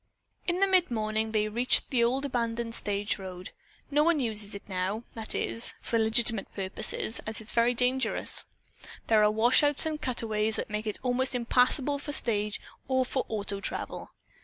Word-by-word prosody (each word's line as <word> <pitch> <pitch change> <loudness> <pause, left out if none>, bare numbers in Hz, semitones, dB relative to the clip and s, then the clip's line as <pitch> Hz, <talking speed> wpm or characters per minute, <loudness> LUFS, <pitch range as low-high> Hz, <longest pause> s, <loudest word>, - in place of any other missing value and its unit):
In 350 0 0
the - - +6
mid 370 -2 +3
morning 220 -1 -2
they 215 -1 +1
reached 240 +4 +3
the 245 -3 +2
old 260 +4 0
abandoned 235 -3 -2
stage 205 -1 0
road. 185 -1 -8 0.4
"No 295 +1 +3
one 335 -1 +2
uses 215 -5 -1
it 200 - -10
now, 190 +3 -3
that 220 -1 0
is, 230 - -2
for 230 - -1
legitimate 225 -1 +2
purposes, 195 +3 -1
as 220 - 0
it - - -8
is - - +2
very 235 +1 +2
dangerous. 255 +2 +1 0.6
There 215 -2 +4
are 210 - +5
washouts 250 +8 +4
and 310 -1 -3
cutways 220 -3 0
that - - -4
make 210 +1 -3
it 210 - -2
almost 255 +1 +1
impassable 250 +4 +2
for 290 +1 -6
stage 210 -5 +1 0.3
or 260 -1 +1
for 260 +1 -3
auto 200 -2 -3
travel." - - -5
230 Hz, 175 wpm, -28 LUFS, 215-255 Hz, 0.6 s, the